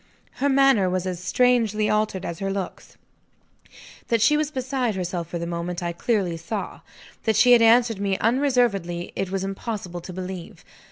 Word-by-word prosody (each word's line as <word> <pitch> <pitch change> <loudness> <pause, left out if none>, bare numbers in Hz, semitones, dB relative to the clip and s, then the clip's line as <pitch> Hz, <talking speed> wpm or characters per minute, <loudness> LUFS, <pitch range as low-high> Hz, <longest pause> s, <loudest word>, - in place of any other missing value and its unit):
Her 285 - +3
manner 270 -8 +4
was 185 0 -1
as 180 -2 -3
strangely 225 0 +2
altered 210 -3 0
as 170 -1 -5
her 195 0 -2
looks. 195 -2 -6 1.1
That 230 - +2
she 230 +8 +4
was 300 -1 0
beside 260 -5 -2
herself 180 -2 -3
for 175 - -5
the 170 - -4
moment, 170 +1 -4
I 170 0 -2
clearly 185 -3 -1
saw. 200 +5 -5 0.5
That 220 -1 +2
she 245 +4 +5
had 240 -1 +7
answered 230 -1 +4
me 195 -1 0
unreservedly, 230 -9 +1
it 195 - -2
was 190 0 -2
impossible 195 -3 -5
to 185 - -9
believe. 185 -1 -7
200 Hz, 170 wpm, -24 LUFS, 180-240 Hz, 1.1 s, had